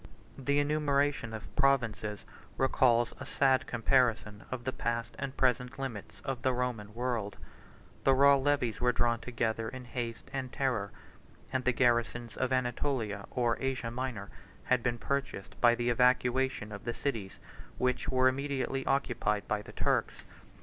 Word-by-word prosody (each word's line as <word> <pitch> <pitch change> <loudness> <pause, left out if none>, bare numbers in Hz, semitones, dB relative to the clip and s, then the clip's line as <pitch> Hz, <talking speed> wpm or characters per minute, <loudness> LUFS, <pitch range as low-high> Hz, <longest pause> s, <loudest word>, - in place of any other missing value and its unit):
The 140 +2 0
enumeration 145 -4 +1
of 105 -4 -8
provinces 115 -6 +1 0.3
recalls 120 -3 +3
a - - -6
sad 135 -2 +2
comparison 115 -3 +1
of 130 -2 -4
the 130 +1 -2
past 115 0 -2
and 140 -1 -4
present 125 +1 +1
limits 130 -7 -6
of 135 -3 -4
the 130 - +2
Roman 115 -4 -3
world: 120 -4 -2 0.7
the 135 - +5
raw 140 +1 +7
levies 135 -5 0
were 125 0 +4
drawn 120 -1 +1
together 115 -2 -2
in 130 0 -8
haste 120 0 -5
and 130 -2 -3
terror; 120 -7 -1 0.6
and 130 -1 0
the 125 - +4
garrisons 120 -2 +1
of 130 0 -1
Anatolia, 120 -4 -1
or 120 -2 0
Asia 130 -3 -2
Minor, 120 -5 -4 0.3
had 125 -1 +2
been 120 0 0
purchased 140 -6 -3
by 120 -1 +6
the 120 0 0
evacuation 125 -1 +2
of 100 -1 -7
the 120 0 -3
cities 110 -9 -3 0.4
which 125 0 0
were 130 0 +4
immediately 135 0 -1
occupied 120 -6 0
by 105 -1 0
the - - -11
Turks. - - 0
125 Hz, 150 wpm, -31 LUFS, 115-130 Hz, 0.7 s, raw